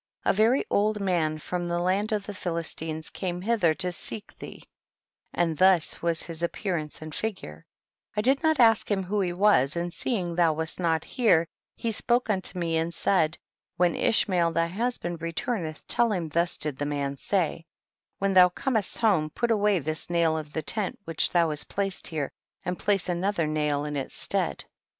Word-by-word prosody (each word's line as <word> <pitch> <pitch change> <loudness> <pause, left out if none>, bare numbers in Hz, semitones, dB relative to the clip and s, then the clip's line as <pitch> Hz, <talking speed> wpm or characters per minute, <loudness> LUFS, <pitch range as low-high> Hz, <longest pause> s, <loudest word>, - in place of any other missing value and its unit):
31. - - +3
A - - -7
very 225 +6 +3
old 210 +1 +2
mgn 170 -5 0
from 175 +3 -3
the 175 0 -1
land 190 +5 0
of 210 -2 -1
the 205 - -6
Philistines 165 -3 -3
came 180 -2 -4
hither 185 -5 +2
to 180 -2 -2
seek 205 +4 -5
thee, - - -10 0.7
and 165 -3 -1
thus 185 -3 +4
was 170 -1 0
his 165 -1 -6
appear 180 +2 -2
ance 155 -1 -5
and 155 -1 -8
figure; 145 - -5 0.5
I - - +3
did 265 +5 +3
not 315 -3 +2
ask 225 -3 +5
him 195 -2 +1
w^ho 200 +2 0
he 180 - -1
was, 175 -7 +3
and 170 0 -3
seeing 180 -4 -1
thou 165 -2 +3
wast 160 +3 -3
not 165 -3 +1
here 215 -10 +3 0.3
he 230 - -2
spoke 240 +1 +1
unto 190 -2 -1
me 165 -2 0
and 165 +1 -1
said, 170 -2 +1 0.4
when 175 -2 +3
Ishmael 180 -6 +2
they 165 +1 +1
husband 185 -4 -3
return 165 +6 -2
eth 155 0 -8
tell 235 -2 +3
him 175 -5 -2
thus 170 +3 +1
did 150 -3 -1
this 145 - -2
man 140 -1 -2
say, 165 +1 -1 0.5
when 195 0 0
thou 180 -1 +8
comest 220 +2 -1
home 190 -9 +2
put 235 +9 -1
away 210 -2 +3
this 155 +1 -3
nail 170 -2 +2
of 155 -2 -5
the 160 0 -3
tent 210 +4 -1
which 165 -1 +1
thou 170 -2 +3
hast 150 - 0
placed 195 -2 -1
here, 155 -4 -3 0.3
and 180 0 -3
place 200 -2 +2
another 180 0 0
nail 150 -1 0
in 150 0 -4
its 135 -2 -4
stead. - - -1
175 Hz, 190 wpm, -27 LUFS, 160-205 Hz, 0.7 s, thou